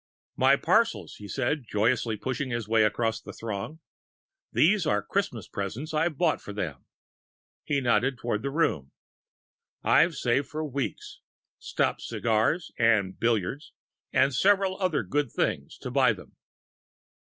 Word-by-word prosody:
"My 135 +2 +5
parcels," 225 +10 +1
he 105 - -9
said, 130 - -1
joyously 110 +1 +1
pushing 130 +4 -3
his 120 -3 -3
way 110 0 +3
across 115 +1 0
the - - -9
throng. 115 +8 -6 0.7
"These 185 0 +3
are 105 -1 +1
Christmas - - -2
presents 115 - -5
I've 155 -1 0
bought 165 -1 +1
for 105 - -8
them." 80 -10 -5 0.8
He 140 -1 0
nodded 130 +1 +2
toward 120 -3 -2
the 140 - -2
room. 135 - 0 0.9
"I've 165 -1 +4
saved 130 +2 +1
for 155 +2 -4
weeks 140 -3 -4 0.4
stopped - - -1
cigars 115 +9 0
and 110 -5 +2
billiards 115 - -1 0.4
and - - +4
and 140 0 0
several 195 +3 +3
other 180 -6 +1
good 145 -3 -1
things - - -2
to - - -7
buy - - +4
them." - - -14
130 Hz, 140 wpm, -27 LUFS, 110-155 Hz, 0.9 s, My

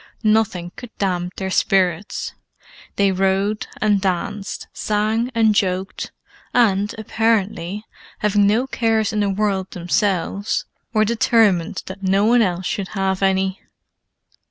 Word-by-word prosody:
Nothing 215 -5 +1
could 245 - -9
damp 180 -2 -1
their 190 -1 -3
spirits: 185 0 +1 0.6
they 200 -1 +3
rode 195 +3 0
and 210 -2 +2
danced, 195 +1 -3
sang 215 +3 0
and 220 -2 +4
joked, 190 -1 -1 0.4
and, 205 -3 +3
apparently, 210 -3 0 0.3
having 205 -1 +3
no 225 +5 +2
cares 225 -4 0
in 215 - 0
the 205 -1 +1
world 195 -1 0
themselves, 190 +2 -1 0.3
were 215 -2 +3
determined 215 -6 +2
that 190 +1 -8
no 195 +1 +2
one 240 +2 +5
else 180 -3 0
should 195 +1 -2
have 190 -1 -1
any. 190 0 +1
200 Hz, 125 wpm, -21 LUFS, 190-215 Hz, 0.6 s, one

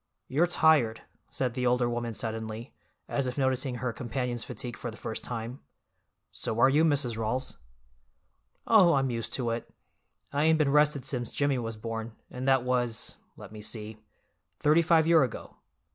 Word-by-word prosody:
"You're 160 +6 +2
tired," 155 -9 +3 0.3
said 125 -3 -1
the 125 0 0
older 125 0 +2
woman 120 -1 -3
suddenly, 110 +1 -5 0.3
as 140 -2 -1
if 125 - -4
noticing 130 -1 0
her 125 -1 -3
companion's 120 0 -3
fatigue 120 -2 -5
for 120 - -5
the 110 - -10
first 110 - -5
time. 120 +2 -5 0.7
"So 110 - -3
are 130 - +6
you, 150 +4 +4
Mrs. 140 -7 +2
Rawls." 125 +4 -2 1.1
"Oh, 190 -8 +6
I'm 135 -2 +1
used 115 -1 -3
to 120 -3 0
it. 115 +1 -4 0.6
I 145 +2 +2
ain't 160 0 +5
been 150 -3 +2
rested 150 -2 +3
since 125 -4 -3
Jimmy 140 -2 +1
was 115 -1 -4
born, 115 +1 -5 0.2
and 125 +1 -5
that 135 -2 +4
was—let 120 -5 -3
me 110 -1 -9
see—thirty 110 +8 -2
five 165 -1 +4
year 165 -1 +6
ago. 130 -4 -3
125 Hz, 160 wpm, -29 LUFS, 115-140 Hz, 1.1 s, are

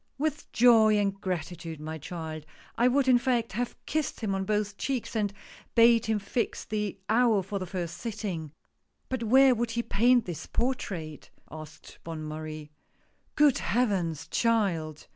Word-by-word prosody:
" - - -47
With 300 +1 -3
joy 225 -3 +6
and 200 -1 +1
gratitude, 170 -3 -4
my 160 +1 -6
child! 160 -1 -6 0.3
I 240 - +3
would 265 +1 +2
in 250 -2 +6
fact, 240 -3 0
have 240 +4 -3
kissed 310 -5 -2
him 210 -3 -1
on 190 0 -1
both 210 0 -1
cheeks, 260 -4 -3
and 210 -2 0 0.4
bade 230 0 +5
him 220 -1 +2
fix 210 +4 -3
the 210 -2 -3
hour 225 -3 +3
for 195 +2 -4
the 185 - -5
first 175 -2 -4
sitting." 190 -7 -4 0.3
" - - -47
But 260 -2 -2
where 260 +4 +6
would 235 0 -1
he 235 +1 -2
paint 240 +2 +3
this 175 -3 -6
portrait? 185 - -3
" - - -32
asked 155 0 -11
Bonne 165 -2 -6
Marie. 155 0 -7 0.3
" - - -42
Good 295 -3 +4
Heavens, 175 - 0
child 175 -9 0
210 Hz, 170 wpm, -28 LUFS, 165-240 Hz, 0.4 s, joy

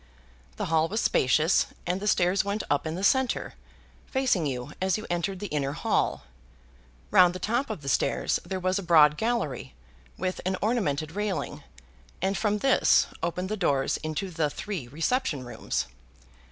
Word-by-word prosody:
The - - -3
hall 160 0 +2
was 215 +6 -2
spacious, 155 - +3 0.2
and 180 +2 -1
the 210 - -4
stairs 185 -1 +3
went 200 +2 -2
up 145 +2 +1
in 160 - -3
the 185 - -4
centre, 260 +4 +2 0.5
facing 255 - +1
you 130 +1 -4
as 190 0 +2
you 215 - -7
entered 175 +3 -1
the 205 - -5
inner 140 -2 0
hall. - - 0 0.9
Round 180 -1 +6
the - - -2
top 235 +8 -1
of 200 -9 -5
the - - -8
stairs 135 - +1
there 185 +2 -4
was 185 +2 0
a - - -3
broad 155 -4 +6
gallery, 150 - -2 0.4
with 185 0 -2
an 185 +1 -1
ornamented 160 - 0
railing, 205 +1 -3 0.6
and 195 +1 0
from 210 -1 +1
this 270 +6 +4 0.2
opened 180 +2 -2
the 215 - -1
doors 140 -9 +1
into 155 +5 -4
the 155 -3 0
three 180 -5 -5
reception 155 - -1
rooms. 120 - -3
180 Hz, 165 wpm, -27 LUFS, 150-205 Hz, 0.9 s, Round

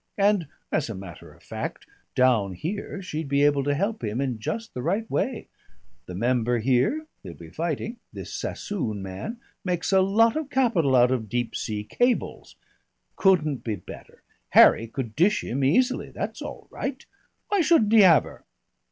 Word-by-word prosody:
And, 200 -5 +2 0.2
as 150 -5 0
a 110 - -4
matter 95 -3 -10
of - - -21
fact, - - -6 0.3
down 120 -7 +3
here 195 - -5
she'd 160 -4 -4
be 140 +1 +2
able 145 -1 +3
to 145 +1 0
help 205 +8 -2
him 105 +3 -2
in 130 -5 -2
just 225 - -4
the 125 - -4
right 200 - -1
way. 245 -4 -1 0.6
The 90 - -7
member 120 +3 +1
here 130 - +1 0.2
he'll 85 - -9
be 80 -1 -12
fighting 170 - -3
this - - -8
Sassoon 115 - -4
man 95 - -6 0.2
makes 180 -1 -1
a 190 -1 +5
lot 220 +4 +3
of 310 -2 -3
capital 225 - +2
out 125 0 +5
of 115 -5 -2
deep 120 +2 -2
sea 105 -2 -3
cables. 245 - -1 0.6
Couldn't 155 -8 +2
be 110 -3 -2
better. 90 - -13 0.3
Harry 115 - +7
could 115 -2 -5
dish 210 +5 +3
him 135 +4 -2
easily. 250 - +2
That's - - -5
all - - -8
right. 270 -1 -5 0.4
Why 405 -2 +2
shouldn't 305 -11 +3
he 225 - +8
have 170 -6 +7
her?" - - -12
150 Hz, 170 wpm, -25 LUFS, -, 0.6 s, he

